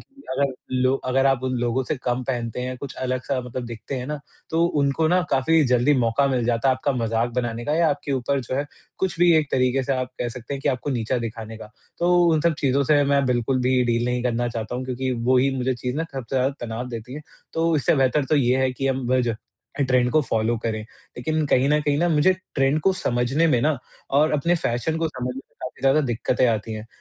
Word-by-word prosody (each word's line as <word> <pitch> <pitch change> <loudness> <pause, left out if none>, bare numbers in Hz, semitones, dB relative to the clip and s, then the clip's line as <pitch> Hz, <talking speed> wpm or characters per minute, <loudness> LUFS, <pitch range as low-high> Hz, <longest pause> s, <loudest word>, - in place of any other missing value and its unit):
कि 280 0 -19
अगर 135 0 0 0.2
लो 130 +1 +2
अगर 135 +1 +2
आप 135 -2 +2
उन 130 - -1
लोगों 120 +2 0
से - - +1
कम 125 0 0
पहनते 120 -2 -3
हैं, 130 0 -4
कुछ 130 +1 -7
अलग 130 0 -2
सा 135 -2 -1
मतलब 125 0 -6
दिखते 115 +3 -6
हैं 125 0 -4
ना, 150 0 -3 0.3
तो 165 +1 +2
उनको 145 0 +1
ना 180 +2 +3
काफ़ी 160 +4 +3
जल्दी 125 +3 +3
मौका 120 +3 +2
मिल 125 -3 0
जाता 120 +2 +1
है 130 - +4
आपका 140 +2 -1
मज़ाक 115 -1 0
बनाने 120 -1 -2
का 150 - 0
या 165 -1 +4
आपके 145 0 -3
ऊपर 135 +1 0
जो 125 +1 -5
है, 145 - -1 0.3
कुछ 185 -3 -1
भी 175 -1 +6
एक 155 -3 +1
तरीके 130 +1 +2
से 135 - -1
आप 130 -1 -2
कह 120 - -1
सकते 125 +3 -6
हैं 135 - -5
कि - - +1
आपको 135 +2 -1
नीचा 120 0 -1
दिखाने 110 -1 -6
का। 105 - -11 0.3
तो 175 +1 +3 0.2
उन 155 - +2
सब 170 0 +2
चीज़ 135 -2 +1
से 145 -2 +5
मैं 140 0 +2
बिल्कुल 125 +1 +1
भी 130 0 +3
डील 120 0 +1
नहीं 125 0 -1
करना 120 0 0
चाहता 115 0 -5
हूँ, 130 +1 -3
क्योंकि 130 0 -2
वो 125 +2 +1
ही 135 +2 +3
मुझे 130 0 0
चीज़ 125 +3 -4
ना 160 - -1
सबसे 135 0 -4
ज़्यादा 130 +2 +1
तनाव 120 +1 -4
देती 120 +1 -7
है, 150 - -6 0.3
तो 165 0 +1
इससे 145 - +2
बेहतर 135 +2 +2
तो 155 - +1
ये 130 -2 +3
है 130 - +2
कि 135 +2 -2
हम 130 -2 -1
ब 130 0 +3
ज 120 -2 0 0.5
अ, - - +5
ट्रेंड 125 -2 +2
को 155 - +5
फॉलो 115 -2 0
करें। 110 -1 -2
लेकिन 155 +7 -4
कहीं 135 0 +3
न 150 0 +3
कहीं 145 +4 +1
मुझे 160 +3 +4 0.2
ट्रेंड 135 +2 +2
को 190 +5 +3
समझने 135 -1 +1
में 125 -6 +3
ना 155 0 +2 0.3
और 145 +3 +3
अपने 150 +4 +2
फैशन 155 0 -1
को 165 0 0
समझने 125 -4 -4
में, 135 - -6 0.2
काफ़ी 130 - -7
ज़्यादा 135 +3 +4
दिक्कतें 120 +1 +1
आती 110 -1 -1
हैं। 110 0 -6
130 Hz, 245 wpm, -23 LUFS, 120-145 Hz, 0.5 s, भी